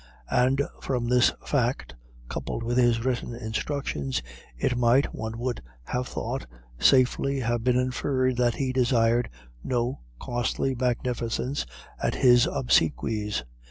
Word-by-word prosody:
And 130 +3 +3 0.2
from 125 -3 -1
this 125 -1 +5
fact, 125 - 0 0.3
coupled 115 - -4
with 120 +1 -1
his 120 -1 +3
written 120 -2 -1
instructions, 110 - -3 0.3
it 125 - 0
might, 120 +3 +3
one 110 0 -5
would 120 0 -3 0.2
have 125 - -3
thought, - - -4 0.3
safely 135 - +3
have 120 -1 -1
been 125 0 +3
inferred 130 0 0
that 120 -2 +2
he 130 -2 -1
desired 120 -2 +2 0.3
no 125 0 -1 0.2
costly 120 +2 -1
magnificence 125 +1 -1 0.4
at - - 0
his 120 -2 +5
obsequies. 105 - +1
125 Hz, 125 wpm, -26 LUFS, 115-130 Hz, 0.4 s, this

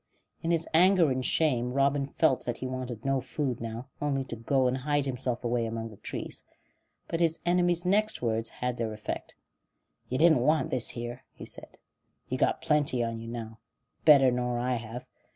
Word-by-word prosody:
In 165 - -2
his 165 -1 +2
anger 175 -2 +5
and 130 0 -1
shame 125 -5 +2
Robin 140 0 +2
felt 140 -2 +2
that 120 -1 -2
he - - -5
wanted 130 -3 -5
no 135 -1 +1
food 130 0 -3
now, 115 +2 -5 0.2
only 140 -2 0
to 125 -3 -4
go 130 +4 +1
and 125 0 +2
hide 145 +1 0
himself 125 -2 -2
away 120 -1 0
among 115 0 -4
the 105 - -13
trees; - - -5 0.6
but 165 - -2
his 165 -1 +2
enemy's 175 0 +2
next 215 +4 +2
words 115 -1 -1
had 125 0 -3
their 115 -2 -2
effect. 105 0 -6 0.7
"You 130 - -1
didn't 160 -2 +5
want 155 +5 +2
this 125 -3 +1
here," 120 +1 -5
he - - -9
said. - - -8 0.5
"You've - - -2
got - - +2
plenty 145 -5 +2
on 115 -1 -3
you 115 - -8
now. 115 -1 -6 0.4
Better 135 -4 +7
nor 125 0 -1
I 125 +1 0
have. 115 +2 -7
130 Hz, 190 wpm, -29 LUFS, 120-150 Hz, 0.7 s, Better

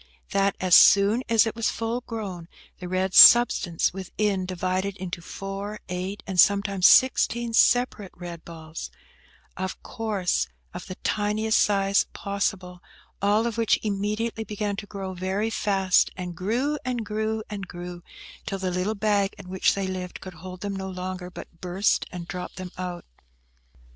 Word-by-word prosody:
That, 195 0 +2
as 185 -1 0
soon 200 +7 +7
as 230 -1 +5
it 225 - -3
was 230 -1 0
full 230 +2 -3
grown, 200 -8 -6 0.3
the 180 - -6
red 185 +1 -1
substance 200 -10 +7
within 190 0 -2
divided 185 +2 -2
into 180 -2 -6
four, 195 +4 -6
eight, 185 +3 -4
and 190 -3 -3
sometimes 200 -1 +5
sixteen 240 -2 +4
separate 235 -4 +3
red 175 -2 -8
balls, 160 -1 -8 0.7
of 190 0 -5
course 210 -5 -1 0.3
of 180 - -8
the 185 - -6
tiniest 215 +1 +1
size 200 -1 +2
possible, 190 -3 -3 0.4
all 205 +3 +2
which 230 0 +2
immediately 215 +2 -2
began 210 -1 -3
to 205 - -7
grow 195 -2 -6
very 190 +4 -2
fast, 195 -3 +2
and 180 -2 -5
grew, 245 - -1
and 245 -3 -3
grew, 220 +1 -2
and 200 -3 -6
grew, 175 0 -8 0.5
till 195 - -2
the 185 -1 -2
little 180 +4 -1
bag 205 -1 +1
in 195 -2 -11
which 190 0 +2
they 195 -1 -2
lived 185 -1 -5
could 185 - -9
hold 180 +3 -10
them 200 -1 -3
no 190 0 -5
longer, 185 0 -5
but 170 -2 -12
burst, 185 +3 0
and 175 -1 -7
dropt 180 0 -6
them 185 -1 -7
out. 180 -1 -6
195 Hz, 155 wpm, -25 LUFS, 180-210 Hz, 0.7 s, soon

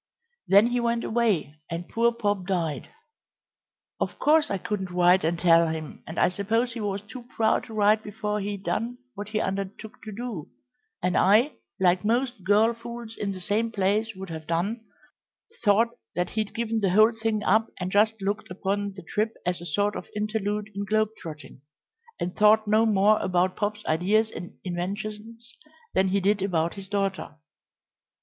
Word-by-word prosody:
Then 200 +3 +7
he 245 +1 +1
went 235 0 0
away, 205 -11 0
and 170 +1 -4
poor 235 +5 +2
Pop 205 -5 -1
died. 170 -6 -2 1.1
Of - - -2
course 310 +1 +3
I 200 - 0
couldn't 190 0 -3
write 180 +1 +4
and 165 +2 +1
tell 170 -1 +5
him, 160 -1 -5
and 160 - -7
I - - +5
suppose 225 +6 0
he 235 - -6
was 200 -1 -2
too 240 +4 -10
proud 220 -1 +2
to 225 - -10
write 210 +1 +4
before 210 0 -3
he'd 200 -1 -4
done 235 +5 -2 0.2
what 205 0 -7
he 215 0 -1
undertook 195 +2 -4
to 215 - -8
do, 215 -7 -5 0.6
and 180 - +1
I, 220 +9 +5 0.3
like 180 -1 +3
most 240 -1 0
girl 210 +4 +4
fools 235 -1 -8
in 200 -1 -2
the 190 - -6
same 210 +5 0
place 215 +1 0
would 190 -2 -8
have 160 -1 -7
done, 195 +8 -1 0.8
thought 220 +2 +4 0.3
that 180 0 -1
he'd 215 -1 -2
given 230 -1 -1
the 200 -3 +1
whole 215 +5 +6
thing 220 -2 -1
up 220 +4 +3
and 180 0 -3
just 220 +2 +3
looked 200 +2 -2
upon 200 +2 -2
the 190 - -9
trip 215 +6 -1
as 180 -1 -1
a 175 - -6
sort 205 +6 0
of - - -7
interlude 210 0 -2
in 200 +1 -3
globe 215 +1 +1
trotting, 155 -4 -10 0.6
and 180 +2 -3
thought 215 +1 +5
no 215 +2 +4
more 210 0 +4
about 185 0 +1
Pop's 210 0 -3
ideas 205 +7 +2
and 175 - -8
inventions 210 +6 -5 0.4
than 190 +1 +3
he 195 +2 +2
did 200 +1 +2
about 170 -4 0
his 195 -1 -9
daughter." 195 -5 -2
205 Hz, 175 wpm, -26 LUFS, 185-220 Hz, 1.1 s, Then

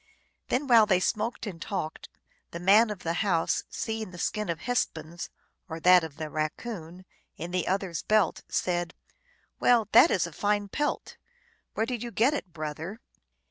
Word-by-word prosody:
Then 265 +4 0
while 230 -5 +6
they 190 -3 +4
smoked 230 +6 -1
and 180 -6 -7
talked, 155 0 -4 0.4
the 170 - -7
Man 205 +6 +5
of 205 -3 -6
the 165 - -1
House, 175 -6 +1
seeing 220 -2 -4
the 180 - -11
skin 210 +3 -2
of 165 -1 -3
Hespu.is, 170 -9 -2 0.4
or 160 0 -5
that 180 +1 +6
of 160 -3 -7
the 155 - -4
Raccoon, 165 +3 -5 0.3
in 170 +2 -6
the 180 -1 -1
other 190 -1 0
s 165 - -3
belt, 215 -1 +2
said, 175 -1 -1 0.3
" 485 - -38
Well, 235 -4 +4
that - - +8
is 185 - +2
a 170 - -7
fine 205 +3 0
pelt! 295 +8 -2 0.6
Where 220 - +1
did 240 -2 -4
you 240 - -4
get 235 +5 +2
it, 195 -11 -4
brother 160 +6 -6
185 Hz, 180 wpm, -28 LUFS, 165-220 Hz, 0.6 s, that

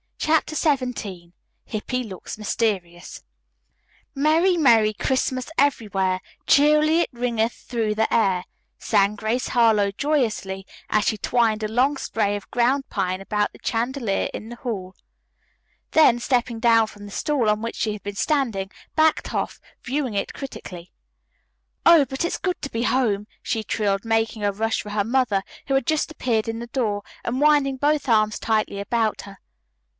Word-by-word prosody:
CHAPTER 310 0 +1
XVII 250 - -1 0.3
HIPPY 250 +4 -3
LOOKS 195 -4 -8
MYSTERIOUS 195 -5 -2 0.9
"Merry, 320 +6 +3
Merry 225 -8 +5
Christmas 255 +2 -1
everywhere, 195 -9 +1 0.3
Cheerily 305 +3 +5
it - - -1
ringeth 235 -2 0
through 225 -3 -3
the 220 +1 0
air," 190 -5 +2 0.3
sang 205 -1 +2
Grace 220 +4 -2
Harlowe 220 -4 +3
joyously 210 -7 -1 0.2
as 210 -1 +2
she 215 - +1
twined 220 -2 +1
a - - 0
long 255 +6 +2
spray 210 -5 -1
of 205 - -8
ground 255 +3 +1
pine 185 -2 -1
about 210 +1 -1
the - - -16
chandelier 235 -2 -1
in 220 - -7
the 240 - -7
hall, 200 -7 -5 1.0
then 275 -7 +5
stepping 240 -2 0
down 230 -1 +4
from 205 -1 -12
the 205 - -10
stool 285 -1 0
on 210 0 +1
which 230 0 -4
she 215 - -1
had 210 - -8
been 205 0 -5
standing, 220 -5 0 0.2
backed 315 0 +2
off, - - -2 0.2
viewing 260 -2 -2
it 200 - -2
critically. 180 -10 -8 0.9
"Oh, 335 -4 +7
but 265 +3 -4
it's - - -2
good 365 -1 -2
to 280 - -4
be 230 +1 -2
home!" 215 -6 +1 0.2
she 220 - -2
trilled, 200 -2 -1
making 225 -1 0
a 205 - +2
rush 225 +3 -1
for 210 - -9
her 205 -1 +1
mother, 230 -4 +1 0.2
who 275 - 0
had 270 - +1
just 310 +1 0
appeared 235 -8 -1
in 225 0 -3
the 235 - -6
door, 215 -5 -1 0.2
and 250 +3 -2
winding 290 -3 +3
both 290 +1 +1
arms 215 -1 +3
tightly 215 -2 0
about 220 +1 0
her. 200 -1 -12
225 Hz, 160 wpm, -23 LUFS, 205-265 Hz, 1.0 s, Oh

